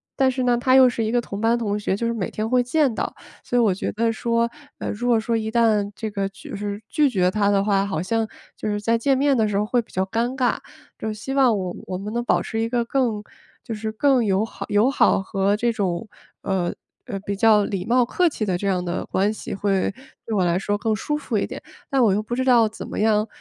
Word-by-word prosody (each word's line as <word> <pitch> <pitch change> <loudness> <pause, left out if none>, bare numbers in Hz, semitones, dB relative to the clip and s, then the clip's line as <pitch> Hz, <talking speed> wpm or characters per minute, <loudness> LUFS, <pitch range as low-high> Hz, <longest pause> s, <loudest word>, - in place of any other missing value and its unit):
但 265 -2 +3
是 255 0 -2
呢， 245 -1 +3
她 255 +1 +2
又 260 -1 +8
是 230 -2 -2
一 220 - -1
个 240 0 +2
同 200 -3 -7
班 230 +2 +2
同 210 -3 -1
学， 200 -2 -1
就 235 - -3
是 - - 0
每 200 -6 -3
天 215 +1 -3
会 250 0 +4
见 275 0 +2
到。 - - -3 0.3
所 245 - -1
以 - - +5
我 215 -4 +4
觉 185 - -3
得 230 +2 0
说， 235 +1 0 0.3
呃， - - -3
如 235 +4 -3
果 235 -2 +4
说 230 +1 0
一 220 0 -2
旦 220 -3 +2
这 220 -2 -4
个 200 -1 -1
就是 200 +1 -6
拒 300 -3 +3
绝 185 -5 +2
她 205 -1 +1
的 200 -1 +3
话， 200 -1 +2
好 170 -5 -2
像， 225 +4 0 0.3
就 - - -4
是 205 0 -1
在 230 +2 +2
见 270 +4 +2
面 280 -1 +3
的 220 - +3
时 210 - -2
候 210 - +1
会 245 +2 +1
比 - - -21
较 190 - +1
尴 235 +6 -1
尬。 255 -2 +1 0.4
就 - - -4
是 215 - -2
希 220 +6 -5
望 255 -5 +4
我 185 -2 -4
我 185 - -3
们 205 +2 -5
能 240 0 -1
保 - - +2
持 225 - -4
一 225 - 0
个 240 0 +1
更 235 -5 0 0.4
就 230 - -5
是 220 0 -4
更 255 +2 +3
友 195 +1 +2
好 - - -8
友 210 +5 +4
好 - - +3
和 195 +1 0
这 235 +1 +1
种， 195 -1 -2 0.4
呃， 185 -3 -1 0.3
呃 200 - -4
比 200 - -3
较 210 0 +5
礼 190 -3 -3
貌 245 +1 +3
客 355 +8 +2
气 220 -7 -3
的 185 - 0
这 200 - -3
样 185 -2 +1
的 175 +1 -3
关 200 +3 +1
系， 215 - -6
会 195 -1 0 0.4
对 220 - -1
我 185 - +3
来 175 +1 +1
说 205 +1 -1
更 220 +1 0
舒 295 +7 -2
服 245 -7 -2
一 - - -1
点。 - - -7 0.3
但 270 -3 +3
我 210 -4 +4
又 210 - +1
不 240 +3 -4
知 260 +1 -1
道 240 -3 +5
怎 215 - -8
么 - - -5
样， 215 0 +2
220 Hz, 285 characters per minute, -23 LUFS, 200-240 Hz, 0.4 s, 又